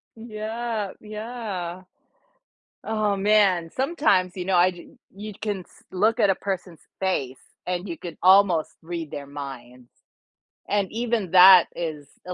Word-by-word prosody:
Yeah, 220 -1 -4
yeah. 210 -5 -6 1.0
Oh 215 -2 0
man, 195 -4 +3
sometimes, 265 - +1
you 180 - -4
know, 190 -1 +1
I 180 +1 +5
j 175 - -13 0.3
you 210 +2 -8
can 210 -3 -3
s 180 - -18
look 220 +5 +1
at 205 - +4
a 195 - +3
person's 185 -4 -5 0.2
face 140 -9 -2 0.3
and 180 +2 -3
you 170 -2 -6
can 170 -3 -8
almost 185 -3 +5
read 165 -2 -6
their 140 -1 -7
minds. 125 -4 -9 0.8
And 200 -2 0
even 225 -5 -2
that 185 -1 +9
is 155 -4 -5 0.2
a 180 - -4
190 Hz, 140 wpm, -24 LUFS, 175-215 Hz, 1.0 s, that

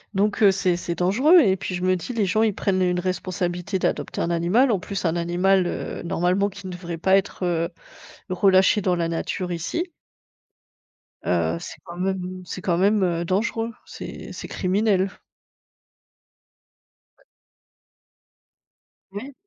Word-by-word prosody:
Donc 205 +2 +1
heu, 200 -2 +7
c'est 185 -2 +1
c'est 175 0 -4
dangereux 240 - +5
et 200 - +4
puis 190 - -5
je 180 - -4
me 185 0 +3
dis: 185 +8 -5
«Les 220 -4 +1
gens, 210 +4 +1
ils 220 -2 +2
prennent 185 -1 0
une 180 -1 +2
responsabilité 180 0 -2
d'adopter - - -1
un 170 - 0
animal», 175 +11 +3
en 205 - +1
plus 195 +1 -4
un 165 0 +1
animal, 180 +2 +2
heu, - - -4
normalement 180 +3 +1
qui 200 0 -12
ne - - -5
devrait 175 -1 -6
pas 190 +4 +3
être, 195 -1 -1
heu, 170 -1 0 0.6
relâché 190 +2 +4
dans 185 -2 +1
la 170 -1 0
nature 180 +2 -3
ici. 255 - -3 1.4
Heu, 85 -2 +1
c'est - - -9
quand 175 -1 -10
même 185 0 -3
c'est 180 - -6
quand 175 -2 +1
même, 200 +2 +3
heu, 170 -1 0
dangereux. 225 +5 -1
C'est - - -8
c'est - - -7
criminel. 195 0 +1 2.1
Ouais. - - -27 1.9
Oui. 255 +8 -7
185 Hz, 155 wpm, -23 LUFS, 175-200 Hz, 2.1 s, heu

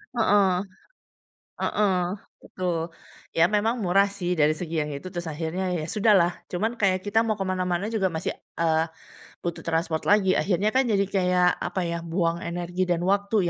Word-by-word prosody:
Heeh, 200 -5 +3 1.0
heeh, 200 -3 +1 0.5
betul. 180 -3 -2 0.6
Ya, 165 - +4
memang 225 +2 +1
murah 195 +2 +4
sih 180 -1 -2
dari 150 +1 +4
segi 165 0 -6
yang 150 0 -2
itu, 140 +6 -7
terus 175 -2 -5
akhirnya 160 +4 -3
ya, 155 - -3
sudahlah. 205 -5 +4 0.2
Cuman 215 +6 0
kayak 185 -2 +2
kita 205 +2 +2
mau 215 - +1
ke 200 - -4
mana-mana 185 +2 -1
juga, 215 -4 +1
masih, 160 -3 -2 0.3
eee, 160 -1 +2 0.6
butuh 170 - -3
transport 165 -1 0
lagi. 200 -2 +4
Akhirnya 205 +3 +1
kan 260 - +4
jadi 200 -2 +2
kayak 180 -2 +2 0.2
apa 190 - -2
ya, 170 0 -2
buang 170 +1 -1
energi 175 0 -4
dan 175 0 +1
waktu 200 +3 +1
185 Hz, 165 wpm, -25 LUFS, 170-200 Hz, 1.0 s, Ya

